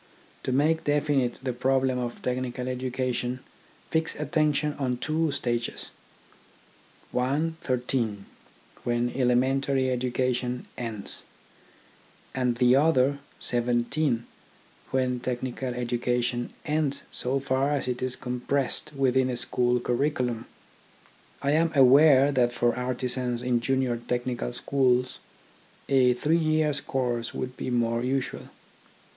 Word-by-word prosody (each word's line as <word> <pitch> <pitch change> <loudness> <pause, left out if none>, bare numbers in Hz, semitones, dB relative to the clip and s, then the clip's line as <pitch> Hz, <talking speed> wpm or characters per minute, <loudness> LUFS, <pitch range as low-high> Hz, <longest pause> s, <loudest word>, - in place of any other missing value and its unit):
To - - -2
make 155 +5 +2
definite 145 -4 +1
the 130 -2 -1
problem 130 +1 +1
of 120 -1 -5
technical 125 0 -2
education 125 -1 -2 0.5
fix 160 0 0
attention 150 -1 +1
on 125 -3 0
two 155 +3 0
ages: 120 -1 -2 1.2
one 145 +6 0
thirteen, 120 -5 -1 0.6
when 120 0 0
elementary 130 +1 +2
education 125 0 -1
ends; 115 -4 -1 1.1
and 125 -2 0
the 125 +1 +4
other 140 -2 +3 0.2
seventeen, 120 +2 0 0.6
when 130 -1 0
technical 125 +1 -3
education 120 0 -1
ends 150 -2 0
so 130 +2 -1
far 135 +1 0
as 145 -3 -1
it 125 -1 -2
is 130 0 -1
compressed 130 +4 -2
within 130 -1 +2
a 125 - -2
school 125 0 +1
curriculum. 125 -2 -1 1.0
I 140 - +2
am 160 +2 +3
aware 140 +1 +7
that 125 -3 +2
for 120 -1 +1
artisans 125 -1 -1
in 125 -1 +2
junior 130 0 0
technical 120 +1 -2
schools 125 0 +1 0.7
a 130 -2 +4
three 155 +6 +2
years' 155 -2 +1
course 120 -3 -2
would 125 0 -4
be - - -4
more 115 -1 +1
usual. 130 +1 -2
125 Hz, 115 wpm, -27 LUFS, 120-135 Hz, 1.2 s, aware